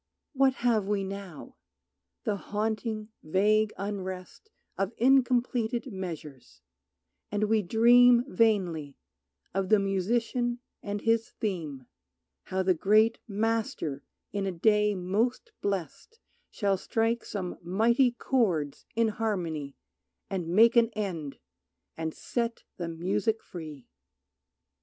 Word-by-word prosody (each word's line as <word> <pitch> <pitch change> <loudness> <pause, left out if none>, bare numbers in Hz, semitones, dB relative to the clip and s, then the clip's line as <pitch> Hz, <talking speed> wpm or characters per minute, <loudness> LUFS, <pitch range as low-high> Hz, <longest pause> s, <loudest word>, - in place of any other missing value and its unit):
What 265 -1 +3
have 220 -5 +3
we 205 -1 0
now? 195 -5 -8 0.7
The 210 - 0
haunting, 215 +1 -3
vague 210 +6 +2
unrest 190 - -6 0.3
Of 195 +3 -2
incompleted 245 -1 +2
measures; 150 - -8 0.7
and 205 0 0
we 215 0 +3
dream 240 +5 +6
Vainly, 180 - +1 0.6
of 195 0 -1
the 215 - +6
Musician 230 +5 0 0.2
and 205 0 -4
His 225 0 +1
theme, 155 - -4 0.6
How 190 0 -1
the 185 0 +4
great 215 +6 +3
Master 210 -9 -1 0.3
in 200 -1 -1
a - - 0
day 210 +3 +3
most 215 - -1
blest 195 - -4 0.3
Shall 200 -2 0
strike 225 +4 0
some 185 -4 -5
mighty 230 +9 +3
chords 200 - -1
in 230 -1 +3
harmony, 175 -10 -3 0.5
And 185 -4 -2
make 225 +8 +5
an 230 -1 +5
end, 175 -9 -4 0.6
and 160 -1 -4
set 235 -1 -3
the 175 - -3
music 195 +6 -1
free! 155 -8 -9
205 Hz, 110 wpm, -28 LUFS, 180-230 Hz, 0.7 s, dream